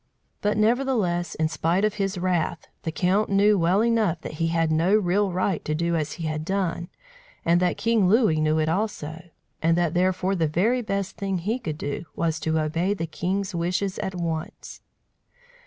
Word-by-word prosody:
But, 210 0 +1
nevertheless, 215 -7 +1
in 160 - +1
spite 170 +5 +1
of 215 - 0
his 195 -1 -2
wrath, 175 -3 -1 0.2
the 160 - -3
count 185 +6 +1
knew 205 +1 +4
well 185 +3 +3
enough 220 -8 +2
that - - -6
he 165 - +2
had 165 -1 +1
no 170 +6 +3
real 200 0 +2
right 185 -1 -1
to 155 - -1
do 170 +1 0
as 155 -2 -1
he 170 - -7
had 155 0 -2
done, 180 -1 -2 0.6
and 170 +1 +4
that 180 0 +1
King 230 -4 +2
Louis 210 -8 +3
knew 155 0 +2
it 155 0 +1
also; 165 -4 -2 0.4
and 165 +1 +3
that 175 -2 +1
therefore 185 +1 +1
the 165 -4 +1
very 215 +11 +1
best 200 -3 -3
thing 195 -1 -1
he 210 +8 -2
could 155 -10 -4
do 145 +3 -4
was 160 -1 -1
to 160 0 0
obey 165 +6 0
the 165 - -3
king's 190 +4 -2
wishes 180 +3 -1
at 190 - -3
once. 165 -2 -5
180 Hz, 190 wpm, -25 LUFS, 165-200 Hz, 0.6 s, knew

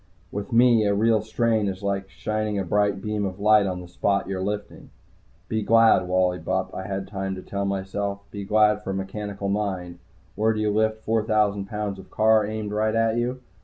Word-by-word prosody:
With 100 +4 -5
me 120 -1 +5
a 100 - +2
real 110 +1 +3
strain 110 -1 0
is 95 0 -4
like 100 -1 -2
shining 105 +2 -2
a 100 - 0
bright 100 +1 +1
beam 105 -1 -2
of 95 0 -4
light 105 0 +5
on 90 -1 -3
the 90 - -10
spot 100 +3 0
you're 95 -1 -3
lifting. 105 +1 -5 0.6
Be 110 0 -1
glad, 115 -3 +4
Wally 90 0 +1
Bupp, 95 0 -2
I 95 - -5
had 95 -1 -4
time 95 -1 -4
to 95 - -8
tell 100 0 -3
myself. 100 +1 -3
Be 100 -1 -6
glad 105 +1 +3
for - - -6
a - - -1
mechanical 100 +1 -4
mind. 95 -4 -2 0.3
Where 110 +1 +1
do 110 - -3
you 105 -1 +1
lift 110 +1 0
four 110 0 +2
thousand 105 -2 +1
pounds 105 -1 -4
of - - -13
car 110 -1 +3
aimed 110 -1 -4
right 110 +1 0
at 115 0 +2
you? 125 +2 -2
105 Hz, 205 wpm, -24 LUFS, 95-110 Hz, 0.6 s, me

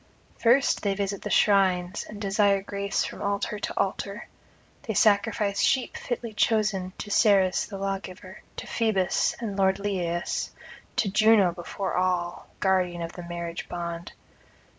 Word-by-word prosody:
[56 245 +4 +4
90]First - - -16
they 200 -1 0
visit 200 0 -2
the - - -5
shrines, 190 -2 +2
and 215 - -8
desire 200 -1 +2
grace 200 0 -1
from - - -6
altar 200 +1 -1
to - - -4
altar; 200 +2 -2 0.5
they 220 -6 -4
sacrifice 205 -1 +2
sheep 260 -2 +1
fitly 240 -2 -4
chosen 210 -4 +1
to 205 - -6
Ceres 195 -4 +3
the 200 - -7
Lawgiver, 195 -1 -5 0.2
to - - -5
Phoebus 210 -6 +1
and 220 -4 -4
lord 190 -1 +2
Lyaeus, 180 -4 -2 0.5
to 225 - +1
Juno 210 -2 +5
before 180 +3 -5
all, 180 -1 -1
guardian 180 -3 +1
of 165 - -6
the 180 - -8
marriage 170 0 -5
bond. 170 -1 -5
195 Hz, 145 wpm, -26 LUFS, 185-210 Hz, 0.5 s, Juno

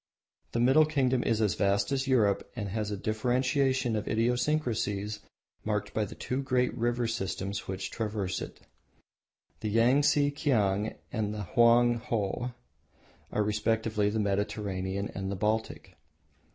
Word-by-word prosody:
The 115 - 0
Middle 135 +6 +5
Kingdom 130 -5 +1
is 115 -2 +1
as 105 -5 +2
vast 100 +1 +1
as 135 0 0
Europe 110 -7 +2
and 105 -4 -4
has 105 +1 -2
a 105 - -3
differentiation 125 +3 +1
of 105 -1 -3
idiosyncrasies 115 -4 0 0.4
marked 105 -1 -2
by 110 - 0
the - - -9
two 130 +2 -3
great 125 -2 +1
river 120 0 0
systems 100 -2 -3
which 95 0 -4
traverse 105 -4 -2
it. - - -8 1.0
The 110 - -3
Yangtse 140 +6 +3
Kiang 110 -8 +1 0.2
and 105 -2 -2
Hoang 120 +3 +4
Ho 115 +1 -2 0.8
are 105 - +1
respectively 105 0 0
the 110 +1 -1
Mediterranean 100 -1 -2
and 95 0 -4
the - - -2
Baltic. 110 +3 -2
110 Hz, 135 wpm, -29 LUFS, 100-125 Hz, 1.0 s, Middle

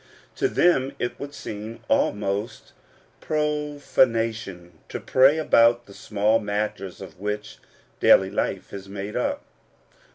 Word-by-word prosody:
To 395 - +2
them 140 - +2
it 120 - -3
would 140 0 -6
seem 110 +2 -7
almost 105 +1 -1
a - - -29
profanation 115 - -1
to - - -4
pray 135 +4 +4
about 120 -6 +4
the 100 - -14
small 105 +2 +1
matters 105 -2 -3
of 95 -2 -11
which 105 +1 -4 0.4
daily 95 0 +5
life 100 -2 -2
is 100 -1 -8
made 100 +1 -6
up. 280 - -1
110 Hz, 125 wpm, -24 LUFS, 100-130 Hz, 0.4 s, daily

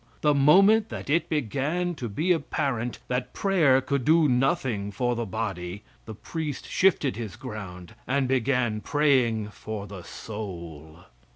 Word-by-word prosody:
The 150 -1 +4
moment 195 +10 +5
that - - -5
it 165 +2 +1
began 150 - -1
to 125 -8 -5
be 155 - 0
apparent 135 -7 -1
that 125 0 -3
prayer 160 -10 +3
could 135 0 -1
do 160 +2 +4
nothing 125 -5 +1
for 120 +4 -1
the 120 -1 -3
body, 95 -2 -4 0.2
the 110 - -8
priest 150 +5 -5
shifted 165 -8 +2
his 110 -4 -5
ground 100 -8 -8
and 135 0 +1
began 125 -4 +1
praying 125 -8 +2
for 105 -1 -6
the 100 -3 -9
soul. 85 -6 -8
125 Hz, 145 wpm, -26 LUFS, 105-150 Hz, 0.2 s, moment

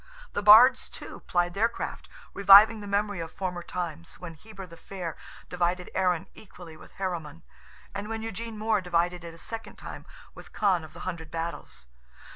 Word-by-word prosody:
The - - -1
Bards, 235 +5 +8
too, - - -9
plied 175 -1 +1
their 220 +4 +2
craft, - - -6 0.2
reviving 200 +3 +8
the 205 - -8
memory 205 -1 -1
of 165 -1 -5
former 180 -2 -4
times, 170 - -6
when 180 -2 -8
Heber 195 +4 -11
the 170 -2 -13
Fair 175 -1 -7 0.3
divided 180 0 -1
Erin 180 -2 +1
equally 175 -5 -13
with - - -16
Heremon, 170 - -5 0.5
and 200 +2 -5
when 225 0 -4
Eugene 225 0 -6
More 215 -1 +1
divided 175 0 0
it 165 -1 -9
a - - -15
second 225 +6 -7
time - - -10 0.3
with - - -14
Con 190 -5 +2
of 155 - -12
the - - -11
Hundred 170 -4 -5
Battles. 165 - -6
185 Hz, 175 wpm, -27 LUFS, 170-205 Hz, 0.5 s, Bards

